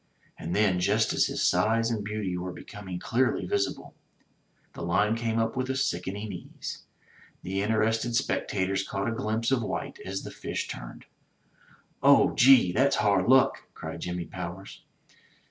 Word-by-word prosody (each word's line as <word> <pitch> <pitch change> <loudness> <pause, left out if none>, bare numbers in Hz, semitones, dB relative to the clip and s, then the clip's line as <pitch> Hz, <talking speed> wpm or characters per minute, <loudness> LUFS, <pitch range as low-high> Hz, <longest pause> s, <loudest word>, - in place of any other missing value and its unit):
And 85 - -4
then 100 -4 +3
just 90 - +2
as - - +3
his - - 0
size 115 +2 +2
and 110 -3 -2
beauty 105 -3 -3
were 90 +1 -4
becoming 95 0 -8
clearly 120 0 0
visible, 100 +2 -2 0.8
the - - -9
line 100 +6 +2
came 115 -1 -1
up 115 +1 0
with 130 0 -2
a 130 - 0
sickening 100 -4 -2
ease. 90 - -8 0.6
The 95 +2 -2
interested 110 +2 +1
spectators 95 -6 0
caught 100 +1 -3
a - - 0
glimpse 115 +1 -1
of 130 -3 +2
white 110 - -4
as 95 +1 -4
the - - -7
fish - - -4
turned. - - -8 1.0
*'0h, - - +5
gee, 125 -7 +6
that's 135 +9 +3
hard 100 -3 +2
luck!" 130 +1 +4
cried - - -7
Jimmy 90 -1 -3
Powers. 90 +3 -8
105 Hz, 155 wpm, -27 LUFS, 95-115 Hz, 1.0 s, gee